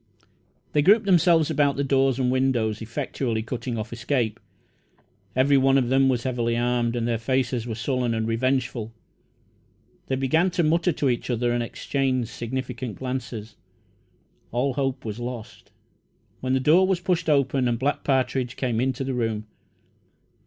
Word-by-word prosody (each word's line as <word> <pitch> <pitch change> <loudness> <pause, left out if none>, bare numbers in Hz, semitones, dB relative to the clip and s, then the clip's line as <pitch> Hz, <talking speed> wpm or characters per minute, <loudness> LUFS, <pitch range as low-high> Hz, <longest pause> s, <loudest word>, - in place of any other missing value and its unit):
They 150 - +4
grouped 210 +7 +5
themselves 170 -4 +4
about 145 -2 +2
the 140 - -1
doors 135 -2 +2
and 125 -2 +1
windows, 120 -5 +1
effectually 115 0 -3
cutting 120 0 -4
off 110 +1 -5
escape. 120 -2 -1 1.0
Every 135 +2 +4
one 135 0 +4
of 125 -3 +1
them 135 0 +4
was 120 -2 0
heavily 120 -2 -1
armed, 120 0 0
and 120 -1 -1
their 115 -2 0
faces 125 0 -1
were 115 - -3
sullen 120 0 -1
and 110 0 -1
revengeful. 120 -1 -1 1.2
They 135 - 0
began 160 +7 +2
to 175 -1 0
mutter 170 +3 +2
to 145 -2 -1
each 120 0 -1
other 120 0 0
and 120 0 0
exchange 130 0 -1
significant 125 -1 -5
glances. 125 -4 -5 1.0
All 130 +3 0
hope 135 -2 -2
was 110 +1 -5
lost, 120 -2 -7 0.7
when 130 0 -1
the 130 - +3
door 165 +8 +4
was 190 -2 +1
pushed 175 -3 0
open 135 -3 +2
and 120 -1 0
Black 140 +4 -1
Partridge 130 -2 0
came 120 -3 -1
into 130 0 -1
the 135 0 -2
room. 115 -3 -2
130 Hz, 160 wpm, -24 LUFS, 120-135 Hz, 1.2 s, grouped